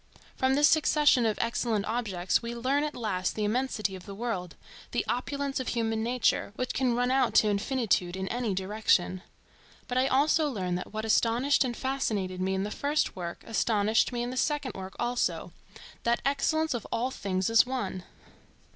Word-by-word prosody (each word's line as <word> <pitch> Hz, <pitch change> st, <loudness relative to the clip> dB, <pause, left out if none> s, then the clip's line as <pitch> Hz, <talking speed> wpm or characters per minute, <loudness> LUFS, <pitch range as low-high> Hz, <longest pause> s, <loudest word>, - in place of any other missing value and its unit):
From 260 Hz, 0 st, +2 dB
this 290 Hz, +1 st, +6 dB
succession 295 Hz, -6 st, +4 dB
of 215 Hz, -, -1 dB
excellent 230 Hz, -3 st, 0 dB
objects 205 Hz, -6 st, 0 dB
we 235 Hz, 0 st, -5 dB
learn 265 Hz, +5 st, +1 dB
at 300 Hz, 0 st, -3 dB
last 190 Hz, -6 st, -2 dB
the 215 Hz, -, -2 dB
immensity 215 Hz, -3 st, -1 dB
of 185 Hz, +1 st, -11 dB
the 200 Hz, -, -7 dB
world, 195 Hz, -6 st, -4 dB, 0.4 s
the -, -, 0 dB
opulence 280 Hz, +2 st, -2 dB
of 260 Hz, -, -4 dB
human 225 Hz, -2 st, -1 dB
nature, 235 Hz, -3 st, +1 dB
which 255 Hz, +2 st, -2 dB
can 255 Hz, -2 st, +1 dB
run 245 Hz, +1 st, +1 dB
out 265 Hz, 0 st, +2 dB
to 215 Hz, -, +5 dB
infinitude 205 Hz, -4 st, 0 dB
in 190 Hz, 0 st, -4 dB
any 240 Hz, -5 st, -1 dB
direction. 190 Hz, -2 st, +1 dB, 0.7 s
But 250 Hz, 0 st, 0 dB
I 260 Hz, -, +3 dB
also 295 Hz, +3 st, +3 dB
learn 185 Hz, -8 st, -2 dB
that 180 Hz, +1 st, -4 dB
what 215 Hz, +1 st, -4 dB
astonished 240 Hz, +6 st, +3 dB
and 245 Hz, -3 st, -3 dB
fascinated 210 Hz, -9 st, -2 dB
me 190 Hz, +1 st, 0 dB
in 190 Hz, -, -1 dB
the 210 Hz, -, -4 dB
first 290 Hz, +5 st, 0 dB
work 170 Hz, -2 st, -6 dB
astonished 220 Hz, 0 st, +2 dB
me 240 Hz, -1 st, -2 dB
in 245 Hz, -, -3 dB
the 255 Hz, -, -6 dB
second 290 Hz, -2 st, 0 dB
work 190 Hz, 0 st, -8 dB
also; 240 Hz, 0 st, -1 dB, 0.5 s
that 235 Hz, 0 st, +1 dB
excellence 310 Hz, +3 st, +1 dB
of 235 Hz, -4 st, -4 dB
all 250 Hz, +3 st, 0 dB
things 190 Hz, -5 st, -2 dB
is 225 Hz, +2 st, +6 dB
one. 205 Hz, -8 st, -3 dB
235 Hz, 180 wpm, -28 LUFS, 200-260 Hz, 0.7 s, this